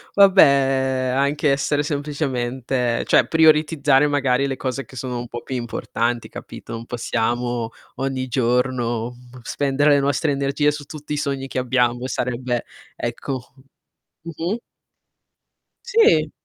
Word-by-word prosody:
Vabbè, 195 -1 +8 0.7
anche 140 +1 +2
essere 145 +1 +1
semplicemente 130 -4 -2
cioè, - - +4
prioritizzare 150 -3 +4
magari 140 -2 +1
le 135 -1 -3
cose 135 +1 -3
che 130 - -15
sono 125 0 -3
un 120 - -6
po' 120 0 -7
più 130 - -5
importanti, 120 0 -2
capito? - - -9
Non 115 0 -6
possiamo, 120 0 -1 0.3
ogni 135 -1 -2
giorno, 120 -1 0
uhm, 125 +1 -13
spendere 145 +3 +1
le 145 - +5
nostre 140 +2 +1
energie 140 +2 +1
su 150 0 -6
tutti 150 +1 -7
i 150 - -1
sogni 140 -2 -2
che 130 - -3
abbiamo, 125 -1 +1
e - - -2
sarebbe 125 0 -2 0.3
ecco. 125 +2 -5 0.7
Mh-mh. 170 +7 -3 1.2
Sì. 410 - +4
135 Hz, 130 wpm, -21 LUFS, 120-145 Hz, 1.2 s, Vabbè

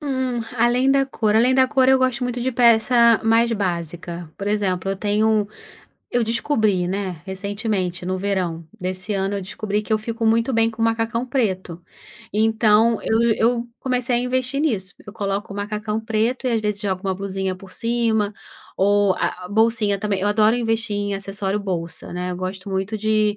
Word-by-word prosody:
Hum, 260 -4 -1 0.2
além 245 +3 +3
da 275 0 +3
cor, 220 -5 0
além 240 +4 +4
da 260 0 +5
cor 260 0 +3
eu 265 0 +6
gosto 255 -1 0
muito 245 0 -2
de 260 +2 -1
peça 235 0 +5
mais 230 +1 +4
básica. 175 -4 -4
Por 200 - -5
exemplo, 195 -3 0
eu 195 - -2
tenho 210 +2 +1
um 215 -2 +2 0.6
eu 245 - +1
descobri, 220 -5 +1
né, 185 -3 -3
recentemente, 190 -2 -3
no 185 +1 -1
verão 185 -4 -2 0.2
desse 185 +2 -4
ano, 195 0 -1
eu 195 - -4
descobri 210 +2 -3
que 220 - -4
eu 215 - +3
fico 230 +1 -4
muito 230 +3 +2
bem 225 0 +3
com 225 0 -11
macacão 225 +2 0
preto. 190 - -2 0.5
Então 220 +1 +3
eu 220 +1 +1 0.2
eu 235 +1 +1
comecei 250 -1 0
a - - +2
investir 255 +2 -1
nisso. 195 - -1
Eu 210 - -9
coloco 200 -2 -3
o - - -7
macacão 210 +1 -3
preto 225 +3 -1
e - - +2
às 225 - +1
vezes 210 -1 -2
jogo 190 -3 -2
uma 190 -1 0
blusinha 190 0 -3
por 185 0 -13
cima, 230 -3 0 0.4
ou 205 0 +3
a 180 - -2
a - - -8
bolsinha 215 -1 +2
também 200 -1 -1
eu 205 - +1
adoro 215 +2 +3
investir 225 -2 -1
em 205 0 -1
acessório 195 +1 -3
bolsa, 175 -4 -5
né, 180 0 -3
eu 180 - -4
gosto 185 +2 -5
muito 195 +3 -2
de 215 0 +1
215 Hz, 190 wpm, -22 LUFS, 195-230 Hz, 0.6 s, eu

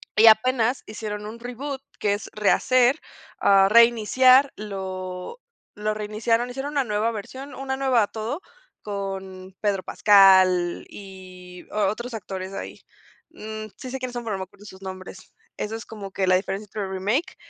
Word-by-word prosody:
Y 220 +1 +7
apenas 245 +2 +4
hicieron 210 -1 -6
un 225 +2 -8
reboot 265 +3 -6 0.2
que 205 -1 +1
es 205 - -5
rehacer, 250 +6 +3 0.4
ah, 195 -1 +5
reiniciar, 240 +4 +5
lo 190 - -6 0.4
lo 210 +1 -1
reiniciaron, 220 +3 -1
hicieron 270 +3 -5
una 280 -2 +1
nueva 215 +1 0
versión, 260 +6 -8
una 265 0 -4
nueva 255 -6 +2
todo, 225 +9 -5 0.4
con 190 -2 -6
Pedro 200 -3 0
Pascal, 190 -3 +5
y 185 -2 -12
o 210 -1 +1
otros 235 +3 -5
actores 190 -2 -6
ahí. - - -7 0.5
Mm, 215 -7 -7
sí 255 - -8
sé 265 - -4
quiénes 255 -1 -5
son, 240 -1 -4
pero 220 -3 -3
no - - -8
me - - -3
acuerdo 200 +2 -19
sus 190 -1 -12
nombres. 185 0 -9 0.2
Eso 215 +1 -3
es 225 - -7
como 200 -3 -9
que 190 -1 -1
la 185 - +5
diferencia 195 +2 -2
entre 205 -1 -5
remake 205 - -1
210 Hz, 160 wpm, -24 LUFS, 195-240 Hz, 0.5 s, Y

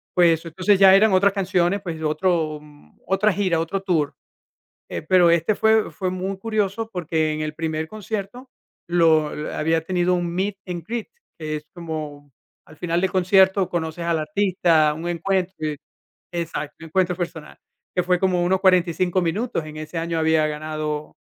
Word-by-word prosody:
pues, 165 -2 +4
entonces 185 +4 +1
ya 190 -1 +8
eran 210 +1 +5
otras 200 +2 +4
canciones, 185 -1 +1
pues, 165 -4 -5
de 160 - -4
otro, 155 -1 0
mm, 145 - -20
otra 195 +3 +2
gira, 185 -3 0
otro 165 +4 -2
tour, 165 -7 0 0.7
eh, - - -4
pero 175 +1 +4
este 170 +5 +2
fue 220 0 +3
fue 185 -2 -3
muy 190 +1 -3
curioso, 215 +1 -2
porque 160 -4 -1
en 155 - -3
el 155 0 -3
primer 160 0 -3
concierto 215 +5 -6 0.4
lo 160 -3 +3
eh, - - -5
había 160 +2 +1
tenido 180 +2 0
un 175 -1 -1
meet 190 +3 -2
and 175 -2 -5
greet, 235 +3 -4 0.3
que 155 -1 -3
es 150 - -12
como 155 -4 -7 0.3
al 155 - -17
final 170 +1 -1
del 190 - 0
concierto 190 0 +4
conoces 170 0 -3
al 170 -1 +1
artista, 160 -2 +2
un 160 +3 -6
encuentro 185 +2 -1 0.8
Exacto, 165 -3 -4
un - - -8
encuentro 180 +2 +1
personal, 165 -3 -6 0.4
que 180 - +2
fue 180 0 +1
como 180 -2 +1
unos 185 +2 +2
45 185 -1 +2
minutos, 195 +3 -1
en 155 0 -9
ese 155 +2 -6
año 165 0 -1
había 160 -1 +3
ganado 155 0 -4
175 Hz, 170 wpm, -22 LUFS, 160-190 Hz, 0.8 s, ya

